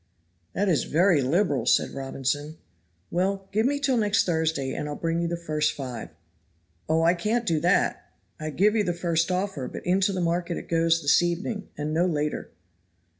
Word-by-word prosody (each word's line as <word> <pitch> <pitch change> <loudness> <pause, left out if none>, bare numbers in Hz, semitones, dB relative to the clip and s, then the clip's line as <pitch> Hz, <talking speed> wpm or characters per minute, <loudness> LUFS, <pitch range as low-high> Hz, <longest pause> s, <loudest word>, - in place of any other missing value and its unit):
"That 200 +2 0
is 160 -9 +2
very 170 -1 +3
liberal," 140 - +1
said - - +3
Robinson. 140 +3 -3 0.5
"Well, 195 +2 -1
give 220 +4 +2
me 285 +1 0
till 270 -3 +1
next 205 -2 +2
Thursday 160 -5 0
and 150 - -4
I'll 145 - -4
bring 165 +1 -1
you 170 - 0
the 170 0 -2
first 155 -2 0
five." 125 -7 -6 0.8
"Oh, 160 +1 +3
I 170 +1 +5
can't 215 +7 -1
do 165 -7 +1
that; - - +1 0.3
I 155 0 -4
give 205 +8 +2
you 215 - +3
the 175 - -1
first 170 -1 0
offer, 185 -7 -2
but - - -8
into 190 +2 +2
the 190 - -3
market 170 0 -1
it - - -8
goes 165 -1 +2
this 145 - +5
evening, 190 +5 -2
and 150 +1 -3
no 170 +3 +2
later." 150 -3 -2
170 Hz, 185 wpm, -26 LUFS, 150-195 Hz, 0.8 s, I